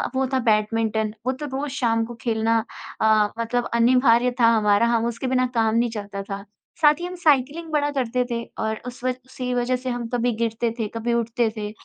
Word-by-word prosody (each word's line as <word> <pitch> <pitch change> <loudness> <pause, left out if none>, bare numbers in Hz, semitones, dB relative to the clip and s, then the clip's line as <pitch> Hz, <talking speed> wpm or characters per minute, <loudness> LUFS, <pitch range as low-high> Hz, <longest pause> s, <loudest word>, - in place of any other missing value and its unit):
वो 265 - +2
था 260 - +3
बैडमिंटन। 220 0 +1
वो 260 - +2
तो 280 +3 -6
रोज़ 275 0 -4
शाम 230 -5 +1
को 240 - -8
खेलना 225 -1 +1 0.4
अ, 215 -1 +4
मतलब 235 +1 -1
अनिवार्य 245 0 +4
था 230 - +6
हमारा, 210 +1 +3
हम 230 -1 +1
उसके 235 +2 -3
बिना 255 0 +2
काम 225 -1 +2
नहीं 235 +1 +2
चलता 205 -3 -6
था। 195 0 -6 0.4
साथ 300 +1 +5
ही 350 - -4
हम 360 +1 -6
साइक्लिंग 300 +2 +2
बड़ा 290 -1 +1
करते 250 -2 0
थे 235 0 -2 0.2
और 220 0 -2
उस 250 0 -9
वज 255 -1 0
उसी 260 -1 -7
की 250 - -1
वजह 245 +1 +1
से - - 0
हम 240 -1 -3
कभी 245 0 +1
गिरते 230 +1 -1
थे, 220 - 0
कभी 235 +1 -1
उठते 235 0 0
थे, 210 -1 -4
235 Hz, 215 wpm, -23 LUFS, 225-255 Hz, 0.4 s, था